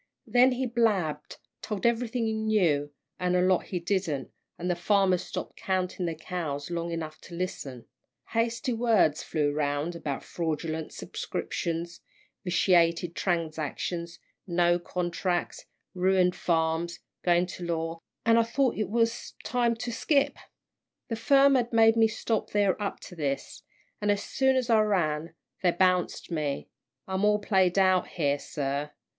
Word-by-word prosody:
"Then 250 +2 +5
he 260 +1 -1
blabbed, 205 -11 0 0.2
told 210 -1 -4
everything 235 0 +1
he 220 - 0
knew, 185 -10 +1 0.3
an' 180 0 +1
a 180 - +4
lot 185 -1 +3
he 180 - -3
didn't, 170 -6 -1 0.3
an' 175 - -4
the 180 - +1
farmers 185 0 +2
stopped - - -6
counting 185 -1 -1
their 165 - -2
cows 155 -2 -4
long 170 0 -2
enough 155 -2 -5
to 170 - -10
listen. 135 -9 -5 0.4
Hasty 230 +2 0
words 225 -10 +3
flew 150 -2 0
round, 145 +3 -1
about 145 -5 -4
fraudulent 160 -1 -3
subscriptions, 170 0 -4 0.4
vitiated 175 -2 +3
transactions, 170 0 -2 0.3
no 175 0 +3
contracts, 175 0 -2 0.3
ruined 185 0 +3
farms, 165 0 0 0.3
going 175 0 +3
to 180 0 -8
law 165 -1 -2 0.3
an' 230 0 +5
I - - +5
thought 245 +3 0
it 210 -4 -1
was 230 +1 0
time 240 -2 +1
to 235 +1 -4
skip. 280 +4 +2 0.7
The 230 - -1
firm 275 +4 +5
had 245 -3 +1
made 225 -1 +5
me 225 -1 +5
stop 220 0 -2
there 205 -1 +1
up 200 - -3
to 180 - -10
this, 140 -4 -3 0.4
an' 205 - 0
as 205 0 +2
soon 265 -1 +2
as 255 -2 +1
I 225 -3 +5
ran, 170 -7 0 0.3
they 180 - +4
bounced 180 0 +1
me 150 -4 -2 0.4
I'm 190 +1 -1
all 210 0 +4
played 190 -3 +2
out 185 -1 +4
here, 145 -4 0
sir. 140 0 -3
180 Hz, 150 wpm, -28 LUFS, 165-220 Hz, 0.7 s, Then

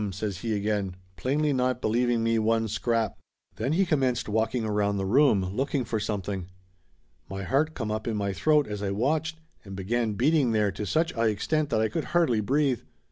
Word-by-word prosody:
says 100 0 -4
he 110 0 -1
again, 100 -2 -1 0.2
plainly 145 +5 0
not 125 -1 +1
believing 120 0 +1
me 115 0 +2
one 110 +1 +1
scrap. 115 +1 -1 0.4
Then 130 +7 -1
he 190 +4 +3
commenced 135 -7 +1
walking 110 +2 0
around 105 -1 0
the 95 - -1
room, 110 -3 +4
look 135 +4 -1
ing 130 -3 +1
for 110 0 -2
something. 100 -3 -3 0.8
My 95 +1 -5
heart 150 - +1
come 110 -4 -3
up 110 +1 -3
in 110 -2 -1
my 100 -1 -1
throat 150 +5 +3
as 105 -3 -5
I 100 - -1
watched, 155 +10 -1 0.2
and 95 -3 -8
began 110 +3 -1
beating 130 +1 +2
there 105 -2 +2
to 100 +2 -5
such 165 +2 +1
a 115 0 0
extent 145 +8 0
that 110 -5 +1
I 110 - +3
could 155 +5 -3
hardly 125 -11 +3
breathe. 135 +2 +1
115 Hz, 195 wpm, -27 LUFS, 105-135 Hz, 0.8 s, room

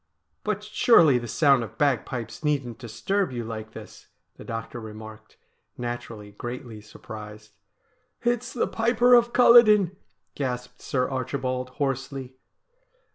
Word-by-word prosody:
' - - -49
But 210 -1 -2
surely 210 - +5
the 120 - -7
sound 135 +1 +3
of 115 - -10
bagpipes 120 - -1
needn't 135 -6 -1
disturb 185 - -2
you 120 -2 -4
like 110 -1 -7
this,' - - -12 0.3
the - - -12
doctor 115 +1 -6
remarked, 110 0 -11 0.4
naturally 115 -4 -6
greatly 120 0 -7
surprised. 105 0 -11 0.4
' - - -45
It's 240 +1 -7
the 245 - 0
Piper 235 +2 +3
of 240 -1 +5
Culloden! 215 -7 +6 0.2
' - - -52
gasped 125 -2 -5
Sir 130 -1 -1
Archibald 130 -1 -3
hoarsely. 135 -1 -3
125 Hz, 130 wpm, -25 LUFS, 115-165 Hz, 0.4 s, Culloden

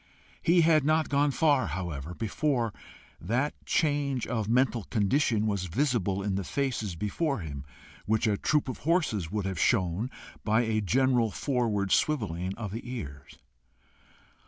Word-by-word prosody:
He 170 +1 +4
had 160 -2 +4
not 155 +2 +2
gone 145 0 +3
far, 145 -1 +2
however, 80 -1 -5
before 115 0 -1 0.5
that 125 - 0
change 145 -5 +1
of 110 -3 -2
mental 120 -3 +2
condition 110 +1 +1
was 100 -3 -1
visible 100 - 0
in 100 -1 -1
the 95 +1 -1
faces 115 -5 -2
before 120 - -1
him, 70 -4 -6 0.4
which 110 +2 +2
a 105 -2 +2
troop 150 +8 +1
of 130 - -5
horses 155 - 0
would 105 +1 -2
have 95 -3 -3
shown 95 +6 +1 0.3
by 110 +1 +3
a 110 -2 0
general 125 +2 +2
forward 110 -6 -1
swivelling 95 - 0
of 105 -4 -5
the 115 +3 -4
ears. 75 - -8
115 Hz, 145 wpm, -28 LUFS, 95-140 Hz, 0.5 s, He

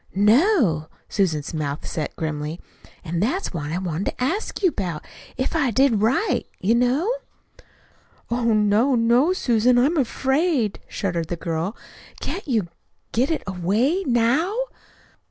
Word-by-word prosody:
"No." 210 - +3 0.2
Susan's 165 -8 -1
mouth 150 -2 -3
set 155 - -4
grimly. 155 +1 -4 0.4
"An' 170 -1 -3
that's 290 - -1
what 150 -3 -4
I 170 - -1
wanted 180 -1 -3
to - - -3
ask 390 - -2
you 370 - +6
about 175 - -4 0.3
if 260 - -1
I 290 -5 +2
did 235 -2 +3
right, 260 - +1
you 205 +5 +2
know." 255 - +2 1.2
"Oh, 240 0 0
no, 220 +4 +3
no, 240 +7 +4
Susan! 245 - +3
I'm 285 +8 +3
afraid," 265 - +1
shuddered 175 -5 -2
the 175 - -2
girl. 165 +4 -3 0.4
"Can't 390 - -5
you 220 -10 0 0.4
get 250 +4 +1
it 325 - -1
away 205 - +1
now?" 255 - +2
230 Hz, 135 wpm, -23 LUFS, 175-270 Hz, 1.2 s, you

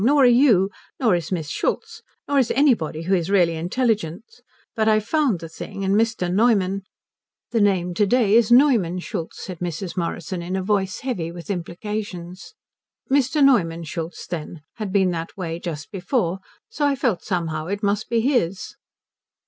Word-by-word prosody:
Nor 280 +4 +5
are - - +7
you. 235 -6 +5 0.3
Nor 230 -7 +3
is 170 -1 -1
Miss 165 -5 -2
Schultz. - - -2 0.3
Nor 285 -1 +2
is 255 - +2
anybody 225 - +2
who 185 +4 0
is 175 -1 +1
really 175 -4 +3
intelligent. 210 +3 -2 0.3
But 220 -2 +1
I 215 -1 +5
found 240 - +1
the 165 - -6
thing, 180 +4 -7
and 195 0 +1
Mr. 225 -3 +1
Neumann 195 -3 +2 0.3
" - - -68
"The 230 - +2
name 185 -3 +2
to 205 +3 +2
day 225 -2 +3
is 230 0 +4
Neumann 240 - +5
Schultz," 175 -2 -5
said 185 -3 -7
Mrs. 175 +1 -4
Morrison, 175 0 -3
in 180 +2 -4
a 190 - -1
voice 195 -1 0
heavy 200 -11 -3
with 170 +3 -7
implications. 185 - -6 0.6
"Mr. 280 +2 +3
Neumann 170 -11 +3
Schultz, 165 +2 -6
then, 165 -2 -6
had 210 -4 -4
been 190 -2 +3
that 165 +3 -5
way 170 -3 -4
just 155 -4 -6
before, 195 -1 0
and 190 - -6 0.3
so 300 -11 0
I 280 - +1
felt 245 -8 0
somehow 165 -4 -2
it 200 +3 -3
must 205 +1 0
be 230 -1 +2
his." 210 -8 0
195 Hz, 180 wpm, -22 LUFS, 170-230 Hz, 0.6 s, are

